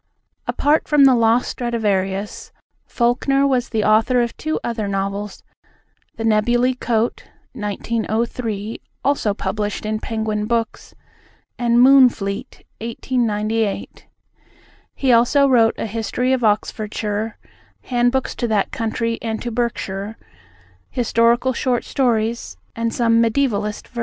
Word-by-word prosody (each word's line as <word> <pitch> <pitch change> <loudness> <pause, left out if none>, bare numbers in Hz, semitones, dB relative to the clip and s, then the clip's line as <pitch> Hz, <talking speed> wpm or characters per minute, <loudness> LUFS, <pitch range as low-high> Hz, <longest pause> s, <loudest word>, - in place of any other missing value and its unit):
Apart 300 +2 +1
from 295 -2 +5
The 265 - +7
Lost 230 0 +3
Stradivarius, 205 -4 -2 0.4
Falkner 265 +3 +1
was 260 -3 +1
the 220 -2 0
author 225 +4 +3
of 235 - -4
two 310 +1 -2
other 225 -3 -2
novels, 200 +1 -3 0.7
The 225 - -4
Nebuly 240 +3 +2
Coat 235 -2 -1 0.3
(1903 220 +1 -3 0.2
also 265 -7 +1
published 210 0 -3
in 215 0 -1
Penguin 215 -2 -2
Books) 230 -1 -2 0.6
and 235 -1 +2
Moonfleet 245 -6 +4 0.2
(1898). 225 -2 -2 0.9
He 265 -2 +1
also 245 +5 +4
wrote 230 -4 +4
a - - -3
History 225 +4 -1
of 255 -2 0
Oxfordshire, 215 0 -1 0.5
handbooks 245 +1 0
to 240 - -2
that 210 -3 0
county 230 0 -2
and 220 -1 -3
to 240 - -3
Berkshire, 220 -3 -3 0.7
historical 235 +1 +2
short 250 0 -1
stories, 235 -3 -1 0.2
and 230 0 -1
some 230 -1 +3
mediævalist 220 -3 0
verse. 240 - -8
230 Hz, 115 wpm, -20 LUFS, 215-245 Hz, 0.9 s, The